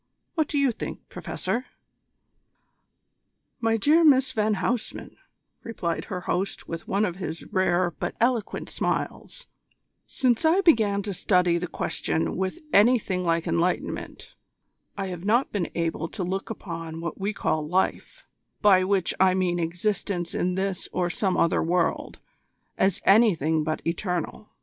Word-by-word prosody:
What 315 -3 +1
do 290 - -2
you 280 -2 +3
think, 230 - -7
Professor?" 250 +2 -3 1.9
"My 225 -1 +2
dear 305 +9 +4
Miss 265 -4 +5
van 215 -3 +1
Huysman," 235 +3 -3 0.5
replied 175 -7 -3
her 180 -1 -5
host 185 +3 -2
with 165 0 -6
one 200 +2 +1
of 180 -3 -4
his 165 -3 -5
rare 185 -2 +2
but - - -5
eloquent 235 -2 0
smiles, - - -3 0.6
"since 245 -1 +1
I 330 +5 +4
began 215 - +3
to 200 -1 -4
study 180 -2 +2
the 180 - -3
question 160 - -2
with 190 - -3
anything 205 -4 +4
like 165 -1 +1
enlightenment, 175 +2 -2 0.6
I 195 - -2
have 175 -1 -6
not 235 +6 +2
been 190 -5 -2
able 165 -1 -1
to 190 +2 -5
look 190 +2 -3
upon 165 -6 -6
what 170 +2 -5
we 200 +2 -1
call 155 -6 -1
life, 190 - -1 0.3
by 190 -3 +5
which 190 -2 +1
I 185 0 +5
mean 180 -2 0
existence 175 +1 -2
in 180 0 0
this 190 -1 -2
or 175 -1 0
some 190 0 0
other 165 - +2
world, 175 +1 0 0.6
as 190 -1 +1
anything 165 -8 +4
but 155 0 -3
eternal. 180 +3 -3
190 Hz, 145 wpm, -26 LUFS, 175-220 Hz, 1.9 s, Miss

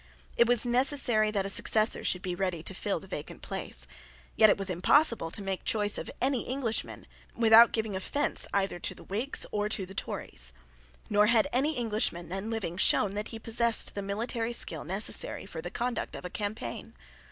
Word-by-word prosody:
It 235 - +4
was 245 -1 +4
necessary 245 -3 +3
that 200 -2 -1
a - - -1
successor 215 +2 +1
should 180 - 0
be 180 -2 -2
ready 180 -3 -2
to 190 - -3
fill 200 +2 -2
the - - -13
vacant 165 -6 -8
place. - - -5 0.5
Yet 215 - +6
it - - +3
was 195 -1 -2
impossible 195 - +2
to 200 +4 -3
make 195 -1 -3
choice 210 -1 +1
of - - -6
any 260 -1 +1
Englishman 250 -4 -2 0.3
without 230 0 +7
giving 220 -3 -2
offence 285 +10 -2
either 195 -3 -1
to - - -1
the - - -13
Whigs 225 +8 -1
or 210 0 -1
to 200 -3 0
the 190 - -10
Tories; - - -3 0.5
nor 210 0 +3
had 230 +2 +4
any 280 +4 +1
Englishman 210 -7 -1
then 195 +4 -4
living 205 -6 -3
shown 195 +1 +4
that 210 +1 -3
he 225 - -7
possessed 230 +1 +2
the 200 - -4
military 225 +4 -2
skill 160 -9 +1
necessary 190 +6 -2
for 175 -4 -7
the 175 - -6
conduct 240 +5 -3
of - - -8
a 180 - -6
campaign. 205 - -5
210 Hz, 190 wpm, -29 LUFS, 190-235 Hz, 0.5 s, without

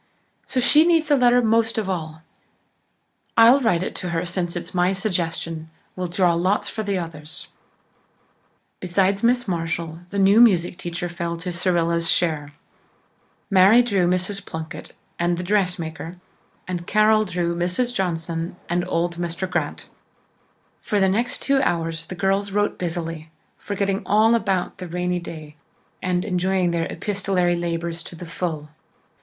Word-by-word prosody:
So 260 - -1
she 300 +5 +6
needs 325 -2 +2
a - - +7
letter 245 -1 +4
most 225 0 +2
of 215 -3 -1
all. 160 -4 -4 1.1
I'll 235 +4 +8
write 185 -7 +1
to 180 - -4
her, 170 +1 -1
since 175 -1 -2
it's 175 - -5
my 180 +1 +2
suggestion. 165 -5 -3 0.3
We'll 185 -1 -3
draw 175 0 +2
lots 185 +5 +1
for 220 - -4
the 200 -2 -1
others." 160 -3 -4 1.3
Besides 190 +2 +1
Miss 245 0 +2
Marshall, 165 -2 -3
the 200 - -5
new 200 +3 +6
music 180 -7 +4
teacher 175 -1 -4
fell 170 -1 -4
to 165 +2 -5
Cyrilla's 170 -2 +1
share. 155 -4 +1 1.0
Mary 195 +6 +7
drew 200 -7 +1
Mrs. 185 +2 0
Plunkett 160 -3 -7 0.3
and 175 0 +1
the 180 - -3
dressmaker, 175 -4 -1 0.5
and 175 -2 -4
Carol 215 +1 +4
drew 175 -3 -2
Mrs. 180 +8 0
Johnson 170 -4 -2
and 175 +1 0
old 170 0 -1
Mr. 175 +2 -3
Grant. 185 - -3 0.9
For 205 - 0
the 190 -1 +3
next 230 +6 -1
two 275 -1 +3
hours 165 -6 -1
the 185 - -6
girls 195 +2 0
wrote 205 +1 0
busily, 165 -2 -4 0.3
forgetting 200 -1 -1
all 215 +3 +4
about 195 -5 0
the 180 - -6
rainy 180 +1 -1
day, 155 -3 -9 0.4
and 180 -1 0
enjoying 185 -2 +1
their 165 -1 -1
epistolary 190 -3 0
labours 170 0 -3
to 170 - -9
the 175 - -8
full. 160 -3 -4
180 Hz, 150 wpm, -22 LUFS, 170-200 Hz, 1.3 s, I'll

